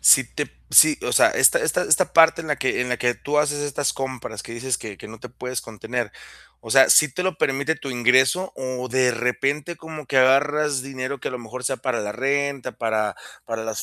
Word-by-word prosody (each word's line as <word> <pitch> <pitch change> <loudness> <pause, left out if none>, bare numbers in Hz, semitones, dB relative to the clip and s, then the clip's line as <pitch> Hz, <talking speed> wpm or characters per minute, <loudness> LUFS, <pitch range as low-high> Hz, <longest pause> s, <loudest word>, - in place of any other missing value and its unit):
si - - +6
te - - -5 0.2
si, 300 -2 +6
o - - -2
sea, - - +5
esta - - +4
esta 460 - 0
esta - - +2
parte 165 0 +5
en 160 - -8
la 150 - 0
que 130 - -1
en 125 - -2
la 125 - -1
que 120 +1 0
tú 150 +4 -2
haces 145 -1 0
estas 145 -1 -2
compras, 130 -2 -6
que - - -10
dices 125 +2 -3
que 105 -3 -8
que - - -11
no 115 0 -11
te 125 - -9
puedes 125 +1 -6
contener, 115 +1 -5 0.5
o 110 - -11
sea, 135 +3 +6
¿sí 155 -4 +5
te 180 - -3
lo 185 -2 -1
permite 145 +3 0
tu 140 -3 -7
ingreso, 130 +9 +2
o 130 -1 -5
de 130 0 +2
repente 135 +7 -2
como 160 -2 -10
que 135 - -2
agarras 140 +2 +3
dinero 135 0 -6
que - - -4
a - - -6
lo 125 - -6
mejor, 120 +2 -9
sea 135 - -1
para 130 -3 -3
la 105 0 -4
renta, 140 +2 -2
para 110 -2 -2 0.3
para 115 -1 -5
las 110 -3 -4
130 Hz, 230 wpm, -22 LUFS, 120-145 Hz, 0.5 s, si